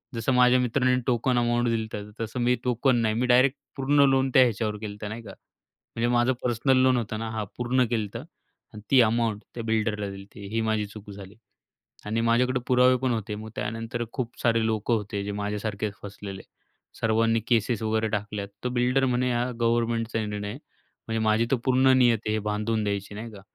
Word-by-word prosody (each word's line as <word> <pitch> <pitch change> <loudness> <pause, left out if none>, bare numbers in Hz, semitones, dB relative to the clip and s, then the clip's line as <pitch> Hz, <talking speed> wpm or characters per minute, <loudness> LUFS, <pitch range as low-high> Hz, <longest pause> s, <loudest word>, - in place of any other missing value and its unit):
जसं 115 +3 0
माझ्या 125 0 +5
मित्रांनी 125 +1 +2
टोकन 125 +1 +1
अमाउंट 120 0 +1
दिली, 110 -1 -1
तर 105 0 -6
तसं 115 +3 -4
मी 125 +1 +3
टोकन 125 +1 +2
नाही, 110 -1 +1
मी 125 - +1
डायरेक्ट 130 +3 +4 0.2
पूर्ण 140 +1 +3
लोन 135 0 +2
त्या 130 - +7
ह्याच्यावर 110 -3 -1
केलं 105 -1 -6
तर 105 - -4
नाही 110 +2 -6
का. 100 - -10 0.7
म्हणजे 115 +1 0
माझं 120 +2 +3
पर्सनल 125 +2 +2
लोन 130 -1 +4
होतं 110 -2 -3
ना 115 0 -4
हां, 110 -2 -3
पूर्ण 125 +1 +2
केलं 110 -3 -1
तर 115 - -4 0.5
आणि 105 - -9
ती 135 - +7
अमाउंट 115 -2 +1
त्या 120 - -4
बिल्डरला 110 -2 -1
दिली. 95 0 -9
ते 100 - -9
ही 115 +3 -1
माझी 110 -1 0
चूक 105 0 -12
झाली 100 0 -11 0.7
आणि 110 +2 -1
माझ्याकडे 125 +2 +2
पुरावे 125 0 +5
पण 130 - +1
होते. 110 -2 -3
मग 110 +1 -8
त्यानंतर 115 +2 -3
खूप 125 -1 -5
सारे 115 -1 +2
लोकं 110 +1 0
होते 105 -2 -3
जे 100 - -3
माझ्यासारखे 105 0 -3
फसलेले. 100 -1 -8 0.6
सर्वांनी 115 0 +2
केसेस 115 -1 +1
वगैरे 110 0 0
टाकल्या, 105 -1 -3 0.2
तर 125 - +1
बिल्डर 125 +2 +2
म्हणे 125 0 +1
हा 120 +1 0
गव्हर्नमेंटचा 115 -1 0
निर्णय 105 -1 -4
आहे. 115 - -6 0.5
म्हणजे 115 0 -1
माझी 110 +2 +3
तर 135 - +3
पूर्ण 130 0 +4
नियत 120 -3 +4
आहे 105 - +1
हे - - +1
बांधून 105 +1 -1
द्यायची 100 0 -3
नाही 115 +3 -7
का? 100 - -11
115 Hz, 200 wpm, -26 LUFS, 105-125 Hz, 0.7 s, त्या